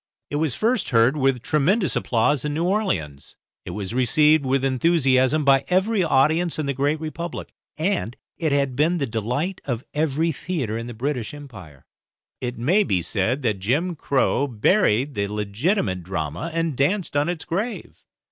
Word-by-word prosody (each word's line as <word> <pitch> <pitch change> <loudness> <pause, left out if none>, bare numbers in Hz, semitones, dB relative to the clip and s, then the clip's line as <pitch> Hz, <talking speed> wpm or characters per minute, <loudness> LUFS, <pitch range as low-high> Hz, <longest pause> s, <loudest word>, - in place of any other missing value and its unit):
It 145 - -1
was 155 -4 0
first 235 +4 0
heard 115 +3 +4
with 135 -4 +1
tremendous 170 +6 +1
applause 125 +4 +1
in 150 0 -2
New 165 - 0
Orleans, 180 - -2 0.3
it - - -6
was 105 0 -5
received 150 +5 +4
with 135 +1 +1
enthusiasm 135 0 +2
by 135 0 +5
every 190 +3 +2
audience 160 +2 +2
in 155 - -2
the 140 - -1
Great 145 +3 0
Republic, 160 +2 -6 0.2
and 160 - -1 0.2
it 160 -3 -1
had 140 -2 +1
been 160 +6 +2
the 140 - 0
delight 125 - -3
of 120 -2 -3
every 155 +2 0
theatre 140 -8 -3
in 115 +1 -4
the 120 - -8
British 125 0 -3
Empire. 100 - -12 0.5
It 125 -1 -4
may 170 - +3
be 90 - 0
said 115 - -1
that 110 -5 0
"jim 145 - 0
Crow" 140 -1 +1
buried 130 - +2
the 100 -3 -1
legitimate 105 - -1
drama 85 - -4
and 165 -2 -1
danced 165 +6 0
on 145 +3 +2
its 175 -2 -4
grave. 210 +8 -4
140 Hz, 165 wpm, -23 LUFS, 120-165 Hz, 0.5 s, by